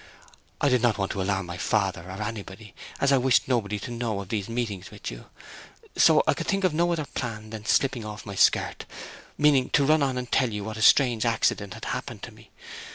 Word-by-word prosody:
I - - +2
did 125 -2 +2
not 120 -3 +2
want 95 -1 -2
to 100 - -3
alarm 95 -1 -1
my 85 0 -7
father 95 -2 0
or 95 +3 -5
anybody, 105 -1 -7 0.3
as 140 - +2
I 135 - +5
wished 130 0 +3
nobody 110 -5 0
to 120 +4 -7
know 115 -4 -2
of 100 -2 -8
these 105 -1 -3
meetings 110 -6 -4
with - - -7
you; - - -10 0.7
so - - +5
I - - +3
could - - -5
think 195 0 0
of 185 -4 +2
no 170 +2 +1
other 160 -3 -1
plan 110 -5 -6
than 110 -1 -8
slipping 135 -4 +1
off 105 0 -8
my 100 - -6
skirt, 95 - +2 0.5
meaning 140 -3 +3
to 140 - +3
run 155 +2 +4
on 135 -2 0
and 125 -1 -5
tell 130 -2 +2
you 105 -1 -4
what 110 +1 -6
a - - -5
strange 120 0 +5
accident 110 -4 0
had - - -8
happened - - -5
to - - -7
me. - - -18
110 Hz, 225 wpm, -26 LUFS, 100-130 Hz, 0.7 s, I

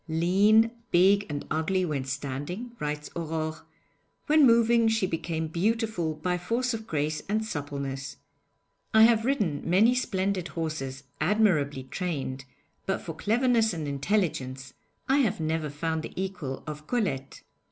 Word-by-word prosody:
'Lean, 200 +8 +4 0.2
big 195 +3 +4
and 145 -1 -4
ugly 180 +4 +1
when 145 -5 -2
standing,' 145 - -4
writes 150 0 -4
Aurore, 160 -1 -4 0.6
'when 300 -2 +6
moving 230 0 +4
she 220 -3 +2
became 165 -2 -2
beautiful 185 -1 0
by 180 +3 -1
force 240 +7 -1
of 220 -1 -6
grace 150 0 -1
and 215 +1 0
suppleness. 140 -5 -5 0.8
I 220 - +8
have 225 -1 +5
ridden 205 - 0
many 200 +8 +4
splendid 195 -6 -1
horses 150 -5 -4 0.2
admirably 155 -11 +2
trained, 135 -3 -4 0.4
but 195 - 0
for 165 - -6
cleverness 225 - +2
and 155 -3 -4
intelligence 140 -4 -1 0.3
I 270 - +3
have 225 -11 +1
never 160 -1 -1
found 160 +2 -2
the - - -8
equal 180 -8 -4
of 150 0 -7
Colette. 185 - -2
170 Hz, 135 wpm, -27 LUFS, 150-220 Hz, 0.8 s, I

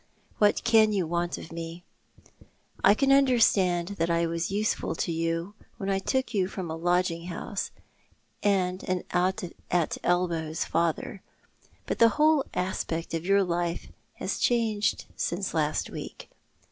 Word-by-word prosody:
" - - -34
What 210 -1 +3
can 220 -2 +5
you 190 -4 +1
want 170 +1 -1
of - - -10
me? 165 +1 -7 1.0
I 200 - +7
can 275 +3 +2
understand 215 -10 +4
that 165 +1 +1
I 170 0 +2
was 165 +1 -2
useful 210 -2 -1
to 170 - -2
you 165 +3 -2 0.2
when 195 0 -2
I 195 - +1
took 260 +4 -1
you 190 -3 +1
from 185 -4 -5
a - - -3
lodging 175 0 0
house 195 +3 -4 0.7
and 185 -2 +1
an 185 -1 0
out 185 +4 +1 0.3
at 175 -3 0
elbows 170 -3 0
father, 170 +3 -1 0.6
but - - -3
the 230 - +7
whole 305 -2 +4
aspect 170 -3 -2
of 165 +2 -3
your 200 0 +4
life 175 -1 -2 0.3
has - - -3
changed 220 -4 +1
since 185 +2 -2
last 155 -2 0
week. - - -8
180 Hz, 150 wpm, -27 LUFS, 170-205 Hz, 1.0 s, I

